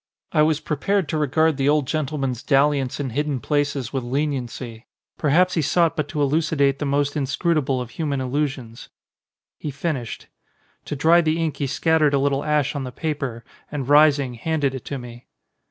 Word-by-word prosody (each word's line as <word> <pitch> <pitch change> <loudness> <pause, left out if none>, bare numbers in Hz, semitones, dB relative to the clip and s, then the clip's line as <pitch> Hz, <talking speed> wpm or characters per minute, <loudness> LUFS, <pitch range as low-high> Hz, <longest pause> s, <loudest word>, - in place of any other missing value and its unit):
I 150 - +3
was 155 -1 +3
prepared 185 +5 -1
to 155 - -1
regard 155 +1 +2
the 135 0 +2
old 150 -2 +3
gentle 150 +1 -2
man's 130 -4 -2
dalliance 140 -1 +2
in 135 -3 -3
hidden 145 +1 -1
places 140 -4 -1
with 135 -2 -1
leniency. 125 -3 -3 0.3
Perhaps 180 +5 +3
he 165 - +1
sought 165 +2 +2
but 150 -3 -2
to 145 0 -1
elucidate 140 -1 +1
the 145 - -2
most 145 +1 0
in 145 -3 0
scrutable 140 -2 0
of 125 -1 -6
human 145 -4 -2
illusions. 130 -3 -3 0.7
He 150 - -4
finished. 140 -4 -4 0.6
To - - -4
dry 165 +4 +5
the 160 0 0
ink 160 -2 -1
he 140 - -1
scattered 155 +1 +2
a - - +2
little 140 0 +1
ash 150 -3 +1
on 140 - -2
the 130 - -6
paper 135 -5 -4 0.3
and 140 -3 -4
rising 145 -3 +5
handed 145 +2 -1
it 130 - -7
to 140 - -4
me. 120 -1 -11
145 Hz, 185 wpm, -22 LUFS, 135-155 Hz, 0.7 s, dry